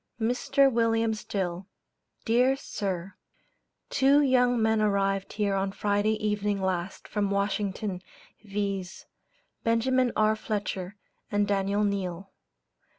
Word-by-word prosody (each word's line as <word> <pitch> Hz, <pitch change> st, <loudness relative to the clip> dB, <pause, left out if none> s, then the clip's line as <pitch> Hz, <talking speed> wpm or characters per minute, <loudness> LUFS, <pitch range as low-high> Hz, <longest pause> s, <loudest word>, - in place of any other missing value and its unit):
MR. 265 Hz, +4 st, +2 dB
WILLIAM 225 Hz, -1 st, +2 dB
STILL: 190 Hz, -4 st, -4 dB, 0.6 s
Dear 250 Hz, +4 st, +3 dB
Sir 195 Hz, -8 st, -4 dB, 0.8 s
Two 275 Hz, +2 st, +5 dB
young 250 Hz, -2 st, +3 dB
men 220 Hz, 0 st, +2 dB
arrived 195 Hz, -2 st, 0 dB
here 205 Hz, -1 st, 0 dB
on 195 Hz, 0 st, 0 dB
Friday 205 Hz, +2 st, +1 dB
evening 210 Hz, -1 st, -1 dB
last 190 Hz, -1 st, -3 dB
from 205 Hz, -2 st, -1 dB
Washington, 200 Hz, -1 st, -1 dB, 0.4 s
viz: 200 Hz, -3 st, -4 dB, 0.6 s
Benjamin 245 Hz, +2 st, +2 dB
R. 215 Hz, 0 st, +3 dB
Fletcher 205 Hz, -3 st, -4 dB, 0.4 s
and 205 Hz, 0 st, +2 dB
Daniel 200 Hz, +1 st, +1 dB
Neall. 195 Hz, -2 st, -2 dB
205 Hz, 105 wpm, -27 LUFS, 195-225 Hz, 0.8 s, Two